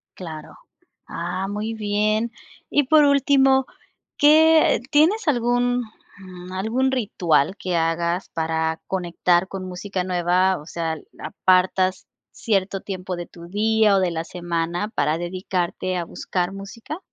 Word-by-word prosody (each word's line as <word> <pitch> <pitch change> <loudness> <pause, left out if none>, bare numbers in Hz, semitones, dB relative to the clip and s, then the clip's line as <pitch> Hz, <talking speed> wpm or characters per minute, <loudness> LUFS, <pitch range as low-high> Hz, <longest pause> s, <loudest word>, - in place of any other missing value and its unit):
Claro, 160 -4 -9 0.5
ah, 185 +3 -4
muy 210 +2 -3
bien. 215 +1 0 0.4
Y 290 - +3
por 305 +2 +5
último, 270 -1 +4 0.5
¿qué, 315 +2 +6
eh, - - -10
tienes 320 +8 +3
algún, 245 -2 +1 0.4
mm, 185 -1 -11
algún 230 +8 0
ritual 190 - +1
que 180 -2 -3
hagas 170 +2 0
para 160 0 -2
conectar 175 0 +1
con 190 -1 -6
música 185 +1 -4
nueva? 180 +1 +1
O 150 - -13
sea, 165 -1 -3 0.3
ah, - - -5
¿apartas 185 0 +2 0.2
cierto 195 -3 -1
tiempo 185 -2 -5
de 175 0 -6
tu 170 0 -13
día 215 +1 +2
o - - +3
de 180 -2 +1
la 165 0 -3
semana 175 +3 -3
para 160 -8 0
dedicarte 180 +1 -3
a 170 - -3
buscar 180 +2 -3
música? 210 - -8
190 Hz, 135 wpm, -22 LUFS, 175-225 Hz, 0.5 s, qué